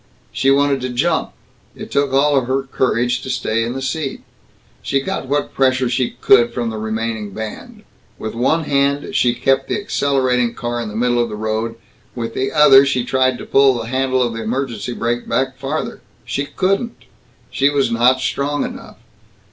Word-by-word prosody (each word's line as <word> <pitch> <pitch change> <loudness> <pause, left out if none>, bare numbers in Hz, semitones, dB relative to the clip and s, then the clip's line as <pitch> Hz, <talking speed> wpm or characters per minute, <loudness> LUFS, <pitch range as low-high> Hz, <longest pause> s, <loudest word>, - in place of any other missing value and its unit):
She 135 - +1
wanted 140 -1 +3
to 130 - -3
jump. 125 -1 0 0.4
It - - -9
took 140 -1 +1
all 140 0 +3
her 130 +2 -1
courage 125 -2 0
to - - -7
stay 115 -3 0
in 120 +1 -3
the 135 0 -5
seat. 150 0 -3 0.6
She 135 - 0
got 190 0 -4
what 145 +2 -1
pressure 130 -2 +2
she 120 0 -1
could 120 -2 +5
from 120 -2 -1
the 110 - -5
remaining 110 -1 -3
band. 110 -1 -7 0.3
With 110 - -5
one 135 +8 +1
hand 140 0 0
she 120 -1 +3
kept 135 +1 +1
the - - 0
accelerating 130 - 0
car 120 0 -3
in 115 - -4
the 105 - -8
middle 120 +1 +1
of 120 - -1
the 105 - -5
road; 110 +1 -2 0.4
with 115 -2 -4
the 130 +1 -1
other 145 -3 +7
she 135 -3 0
tried 130 -1 +1
to - - -8
pull 135 -1 +4
the 115 -1 -5
handle 130 0 +1
of 120 -1 -2
the 115 - -5
emergency 120 -1 -3
brake 120 +1 -2
back 135 0 0
farther. 140 +4 -4 0.2
She 140 - -2
couldn't. 195 - -1 0.5
She 140 +1 +2
was 140 -2 +1
not 125 +3 +3
strong 145 +2 -1
enough. - - -9
130 Hz, 185 wpm, -19 LUFS, 120-140 Hz, 0.6 s, other